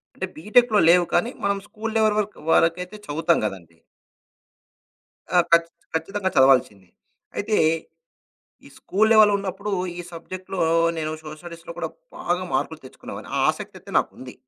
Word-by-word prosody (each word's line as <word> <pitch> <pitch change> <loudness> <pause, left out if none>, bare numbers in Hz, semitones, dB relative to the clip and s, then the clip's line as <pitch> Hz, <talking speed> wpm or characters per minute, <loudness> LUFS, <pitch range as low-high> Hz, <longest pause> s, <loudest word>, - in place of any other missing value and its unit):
అంటే 190 - -3
బీటెక్‌లో 215 +5 +3
లేవు. 175 +1 +6
కానీ 175 +8 +2
మనం 200 0 +1
స్కూలు 220 +1 -6
లెవల్ 215 -1 +3
వర్ 210 - +1 0.2
వరకైతే 180 +5 +2
చదువుతాం 165 +3 +1
గదండీ! 85 -5 -8 1.6
ఆ! - - +7
ఖచ్చ 170 0 +6 0.3
ఖచ్చితంగా 190 +4 -1
చదవాల్సింది. 130 -8 +4 0.5
అయితే. 210 +1 0 1.1
ఈ - - -12
స్కూలు 215 +3 +1
లెవెల్ 215 -1 +7
ఉన్నప్పుడు 200 +1 -3 0.3
ఈ - - -3
సబ్జెక్ట్‌లో 185 +3 -7 0.4
నేను 155 -1 -2
సోషల్ 155 0 -9
స్టడీస్‌లో 170 0 -9
కూడా 170 -2 -3 0.3
బాగా 175 +1 -1
మార్కులు 160 - -1
తెచ్చుకునేావాన్ని. 130 - -10
ఆ - - +1
ఆసక్తయితే - - -10
నాకుంది. 130 -1 -5
175 Hz, 135 wpm, -23 LUFS, 160-205 Hz, 1.6 s, ఆ